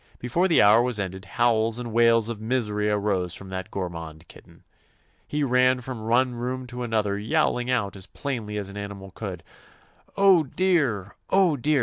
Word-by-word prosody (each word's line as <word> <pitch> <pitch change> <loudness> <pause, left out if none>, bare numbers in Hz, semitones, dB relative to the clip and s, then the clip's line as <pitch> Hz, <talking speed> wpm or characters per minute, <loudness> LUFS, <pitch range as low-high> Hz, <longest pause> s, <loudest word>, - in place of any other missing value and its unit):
Before 170 +10 0
the 170 - +5
hour 105 +3 +6
was 120 -3 -1
ended 95 0 -5
howls 115 +1 +1
and 120 -2 -5
wails 115 -1 +4
of 115 -2 -5
misery 105 -3 -1
arose 100 -4 0
from 95 - -9
that 95 -1 -5
gormand 85 -4 -6
kit - - -15
ten. - - -21 0.6
He 150 0 -1
ran 125 -1 +3
from 120 -3 -6
one 125 +2 +2
room 125 +2 -4
to 125 - -5
an 120 -2 -4
other 105 -2 0
yowling 120 +3 0
out 110 -6 0
as 95 -1 -7
plainly 110 -4 -4
as 100 -2 -4
an 100 +1 -9
animal 100 -1 -7
could, 95 -4 -7 0.7
"Oh, 195 -3 +6
dear 145 - +1
I 100 - -17 0.2
Oh, 185 -5 +4
dear! 145 +2 +1
115 Hz, 190 wpm, -25 LUFS, 100-125 Hz, 0.7 s, hour